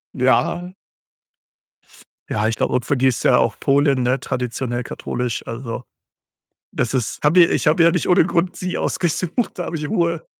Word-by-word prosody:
Ja. 175 +7 +1 1.6
Ja, 105 0 0
ich 115 - -1
glaube, - - -1
und 125 -1 0
für 145 - 0
die 130 +1 +3
ist 130 - 0
ja - - +5
auch - - 0
Polen, 140 -1 +2
ne, 125 +2 +1
traditionell 125 -1 -3
katholisch, 125 -2 -4
also, 115 0 -6 0.9
das 125 +1 -1
ist 120 -4 -2
habe 165 +5 +5
ja 170 - +5
ich - - 0
habe 160 +2 +4
ja 170 - +6
nicht 180 +1 -1
ohne 180 -2 +5
Grund 180 0 0
sie 185 0 -4
ausgesucht, 180 +4 -2
da 175 - -2
habe 165 - -5
ich 150 -1 -4
Ruhe. 170 0 -1
140 Hz, 180 wpm, -20 LUFS, 125-170 Hz, 1.6 s, ja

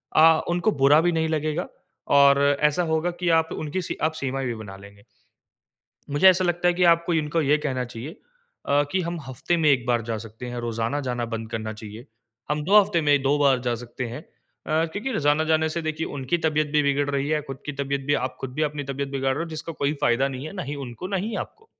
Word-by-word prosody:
अ, 160 0 +6
उनको 175 +5 +1
बुरा 145 +3 +7
भी 175 +1 +2
नहीं 160 -1 0
लगेगा 155 +2 -1 0.5
और 140 0 +6 0.2
ऐसा 150 +4 +3
होगा 160 +2 +1
कि 180 -1 0
आप 160 0 -3
उनकी 155 +5 -3
सी 175 - -5
आप 155 0 +2
सीमाएँ 135 0 -2
भी 120 - -2
बना 100 -3 -9
लेंगे। 100 +1 -15 1.1
मुझे 145 +7 +6
ऐसा 185 0 +4
लगता 175 0 +1
है 175 - +2
कि 180 +1 +2
आपको 170 0 +4
इनको 155 +1 0
ये 145 +1 +3
कहना 130 -4 -2
चाहिए 125 +5 -8 0.5
अ, 145 +1 +3
कि 190 - +1
हम 170 0 -3
हफ़्ते 135 +5 -2
में 160 -2 +2
1 130 -4 +2
बार 120 -1 +1
जा 115 0 -3
सकते 115 +2 -9
हैं, 120 0 -5
रोज़ाना 115 +4 -2
जाना 120 -1 -1
बंद 115 0 -4
करना 110 -1 -4
चाहिए। 110 +3 -10 0.4
हम 150 0 0
2 200 +6 +6
हफ़्ते 195 -4 0
में 145 -1 +5
2 140 +2 +2
बार 140 -3 +4
जा 120 - +1
सकते 120 +1 -6
हैं। 120 +5 -7
अ, 160 0 -4
क्योंकि 250 +8 -3
रोजाना 150 -3 +2
जाने 160 0 +3
से 165 +2 -3
देखिए 155 0 -3
उनकी 135 +6 -1
तबियत 155 -1 +1
भी 150 -1 +3
बिगड़ 140 0 +1
रही 140 0 -1
है, 155 0 +1
खुद 135 -2 -8
की 145 - -3
तबियत 140 0 -2
भी 145 - +2
आप - - -20
खुद 130 -1 -5
भी 155 - -1
अपनी 145 -1 -5
तबियत 140 +1 -3
बिगड़ 135 -1 -1
रहे 150 - -2
हो, - - -9
जिसका 160 +1 -6
कोई 145 -2 -1
फ़ायदा 130 0 +2
नहीं 135 +1 -6
है। - - -7
ना - - -7 0.2
उनको 125 +7 -7
ना 195 +1 -2
ही 225 - -4
आपको। 440 +1 -25
145 Hz, 235 wpm, -24 LUFS, 130-160 Hz, 1.1 s, बुरा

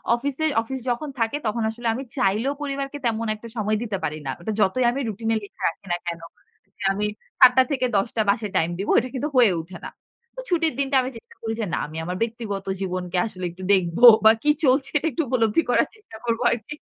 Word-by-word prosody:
অফিসে 280 +5 -2 0.2
অফিস 265 +4 -5
যখন 245 +5 -2
থাকে 230 +5 0
তখন 225 +1 -1
আসলে 235 +1 -5
আমি 255 +4 -4
চাইলেও 220 +5 +1
পরিবারকে 275 0 -3
তেমন 230 -1 0
একটা 215 +2 -11
সময় 215 0 0
দিতে 215 -4 -3
পারি 155 -1 -2
না। 135 - -2
ওটা 195 +6 -4
যতই 210 +5 +2
আমি 265 - -3
রুটিন 225 +1 -3
এ - - +2
লেখা 200 - -13
রাখি 170 - -13
না 175 - +1
কেন। 170 -1 -3 0.7
আমি 205 +2 -1 0.3
৭ 250 - +9
টা 260 - +8
থেকে 260 -2 +1
১০ 195 +3 +2
টা 225 - +2
বাসায় 210 0 0
টাইম 165 - +2
দিবো। 195 - -1
এটা 250 +2 -4
কিন্তু 285 +4 -2
হয়ে 235 -5 +6
ওঠে 175 +2 -11
না। - - -5 0.5
তো - - -8
ছুটির 330 -4 +1
দিনটা 275 0 0
আমি 255 - -3
চেষ্টা - - -16
করি 225 -1 -3
যে, 220 - 0
না - - +1
আমি 155 +2 -9
আমার 180 +2 -3
ব্যক্তিগত 220 -4 -3 0.2
জীবনকে 180 -1 -3
আসলে 185 -4 -6
একটু 185 +2 -11
দেখব 175 -3 +1 0.3
বা 220 - +10
কি 300 - +2
চলছে 265 0 +3
এটা 300 - -1
একটু 270 - -1
উপলব্ধি 230 +2 +2
করার 245 - +3
চেষ্টা 425 - -14
করব 230 -1 0
আরকি। 235 +5 -4
225 Hz, 225 wpm, -23 LUFS, 195-260 Hz, 0.7 s, বা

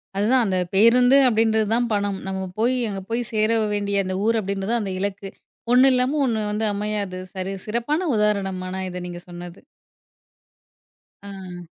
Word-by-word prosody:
அதுதான் 235 +5 +3
அந்த 190 -3 0 0.2
பேருந்து 245 +6 +5
அப்டின்றது 220 -2 +2
தான் 240 0 +1
பணம். 205 -1 -1
நம்ம 190 0 -3 0.2
போய், 235 +4 +2 0.2
அங்க 195 -1 -5
போய் 235 +1 -1
சேர 215 0 +2 0.2
வேண்டிய 200 -1 0
அந்த 185 0 -3
ஊர் 230 0 +2
அப்டின்றது 195 +1 -3
தான் 235 -1 +1
அந்த 195 - -4
இலக்கு. 200 0 -4 0.4
"ஒண்ணு 260 +2 +6
இல்லாம 255 +4 +1
ஒண்ணு 225 -4 0
வந்து 215 +1 -1
அமையாது" 205 -2 -3
சரி 190 0 -4
சிறப்பான 290 +11 -1
உதாரணமான 195 -3 -1
இத 180 0 -6
நீங்க 175 0 -8
சொன்னது. 175 +1 -10 1.6
ஆ. 190 -3 -9
205 Hz, 155 wpm, -22 LUFS, 190-230 Hz, 1.6 s, ஒண்ணு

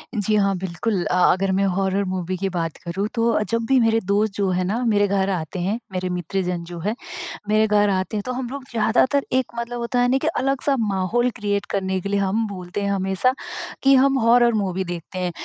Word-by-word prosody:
जी 215 0 +1
हाँ, 195 -2 +2
बिल्कुल। 185 +2 -2
अ, - - 0 0.2
अगर 190 +1 +1
मैं 190 +1 +2
हॉरर 195 +1 +1
मूवी 185 0 -2
की 195 +1 -1
बात 165 -3 -3
करूँ 195 +5 -2
तो 230 0 +2
अ, - - +1
जब 230 0 0
भी 265 -1 +4
मेरे 225 -1 +3
दोस्त 205 +1 +1
जो 195 -2 +1
है 180 0 0
ना 220 +7 -1
मेरे 205 -2 +3
घर 195 0 +1
आते 175 -1 -3
हैं, 200 +6 -1
मेरे 185 0 -2
मित्र 180 +2 -2
जन 175 -1 -3
जो 170 0 -8
है, 210 +7 -2 0.5
मेरे 215 +1 +4
घर 205 0 +3
आते 190 +2 -1
हैं, - - -1
तो 255 - -2
हम 250 -1 -4
लोग 280 0 -6
ज़्यादातर 240 +5 +2
एक 260 -1 +3
मतलब 235 +1 -4
होता 245 +1 -1
है 245 - +4
ना 265 - +3
कि 315 - -1
अलग-सा 275 +1 +1
माहौल 210 +4 +1
क्रिएट 205 -2 -1
करने 190 -1 -1
के 200 - -4
लिए 200 0 +1
हम 205 +4 +1
बोलते 185 0 -5
हैं 200 - 0
हमेशा, 195 +6 +1 0.5
कि 270 0 +6
हम 270 0 +4
हॉरर 235 +1 +5
मूवी 190 -3 -1
देखते 175 +1 -6
हैं। 180 -1 -1
200 Hz, 230 wpm, -22 LUFS, 185-230 Hz, 0.5 s, कि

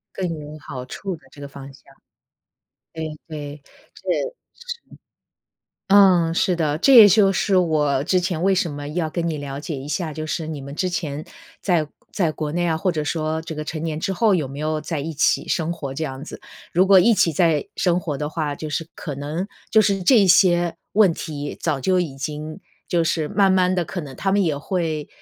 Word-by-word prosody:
更 185 -2 -2
有 150 +1 -9
好 130 -5 -7
处 185 +7 -5
的 - - -23
这 145 - -15
个 140 - -7
方 140 0 -10
向。 135 - -19 1.1
对 160 -1 -4 0.2
对。 145 -2 -7 0.3
是， - - -16 0.5
是。 485 -1 -8 1.1
嗯， 185 -4 +6
是 180 - +2
的。 155 -3 0
这 270 +10 +5
也 220 -4 +11
就 195 0 +5
是 195 +1 +1
我 150 -6 +2
之 185 +2 +2
前 175 -2 -2
为 195 0 +3
什 175 -3 0
么 145 0 -6
要 160 0 -2
跟 170 0 -2
你 155 -2 -3
了 140 -1 -5
解 155 -1 -5
一 135 +2 -7
下， 160 -1 -2
就 155 +1 -5
是 160 +1 -3
你 155 -3 -5
们 140 +1 -8
之 185 +3 -1
前 155 -4 -3 0.4
在 165 -6 +1 0.2
在 175 -6 +1
国 150 -1 -4
内 175 +1 0
啊， 160 -2 +1
或 180 +2 0
者 155 - -2
说 160 +1 -2
这 165 -1 -6
个 155 0 -5
成 155 0 -5
年 160 -2 -2
之 195 - -1
后， 210 +2 +3
有 160 -6 0
没 140 +2 -8
有 155 0 -1
在 155 0 -3
一 160 +3 -4
起 145 - +1
生 165 0 0
活 140 -5 -6
这 160 - -3
样 135 -1 -6
子。 - - -9 0.3
如 185 +3 +4
果 190 -1 +7
一 230 +6 +5
起 170 -5 +3
在 155 -2 +2
生 175 -2 +2
活 150 -5 -3
的 150 - -2
话， 155 -2 -2
就 155 +1 -6
是 160 +2 -3
可 150 - -6
能 150 +6 -3 0.2
就 220 - +6
是 195 -2 +1
这 225 +5 +6
一 195 - +3
些 175 -1 +4 0.2
问 200 -4 +5
题， 145 -2 -6
早 150 -5 -1
就 185 +7 +2
已 160 -6 -3
经 150 +5 -5 0.3
就 170 -2 +1
是 160 -2 0
慢 200 -2 +3
慢 185 -1 +3
地 180 -2 0
可 180 - -5
能 140 -5 -9
他 195 +6 0
们 200 0 +3
也 160 -5 0
会 160 -3 -2
160 Hz, 235 characters per minute, -22 LUFS, 150-185 Hz, 1.1 s, 也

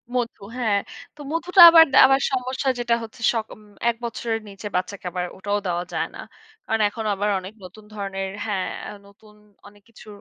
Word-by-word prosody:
মধু। 240 -3 -2 0.2
হ্যাঁ, 215 -5 +1 0.4
তো 300 - -12
মধুটা 345 +3 +3
আবার 330 -1 +9
দা - - +5
আবার 270 0 +3
সমস্যা 260 +1 -2
যেটা 240 -1 +1
হচ্ছে 225 +1 -12
সকম 220 -2 -5
উম 200 - -23
১ 235 - -1
বছরের 225 -1 -3
নিচে 195 +1 -8
বাচ্চাকে 185 +1 -3
আবার 180 -1 -3
ওটাও 205 +2 -2
দেওয়া 175 0 -2
যায় - - -1
না। - - -10 0.5
কারণ 225 0 -1
এখন 220 +1 -7
আবার 205 +2 -1
অনেক 185 +2 -10
নতুন 200 +4 -14
ধরনের 195 -2 -4 0.2
হ্যাঁ, 195 -4 -2 0.4
নতুন 210 +1 -20 0.3
অনেক 205 0 -19
কিছু 225 - -17
215 Hz, 180 wpm, -23 LUFS, 195-240 Hz, 0.5 s, আবার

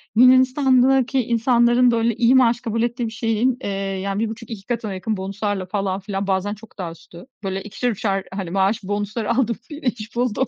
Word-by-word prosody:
Yunanistan'daki 260 +1 +4
insanların 240 +1 +3
böyle 230 -1 +1
iyi 245 +2 +4
maaş 240 -2 +4
kabul 230 0 -2
ettiği 240 0 -1
bir - - -6
şeyin, 225 +2 0
eee, 200 - -3
yani 195 0 -3
1.5-2 225 -2 -5
katına 230 -4 -2
yakın 200 +3 -3
bonus'larla 195 0 -3
falan 195 0 -2
filan 195 0 -4
bazen 195 +1 0
çok 215 +1 -14
daha 175 -4 -4
üstü, 170 +4 -14 0.2
böyle 195 0 -3
ikişer, 210 +4 -2
üçer, 195 -2 -1
hani, 190 -3 -4
maaş 195 +3 +1
bonus'ları 205 +3 -2
aldım, 235 -3 +1 0.3
iş 240 -4 -3
buldum. 245 +1 0
220 Hz, 170 wpm, -21 LUFS, 195-240 Hz, 0.3 s, Yunanistan'daki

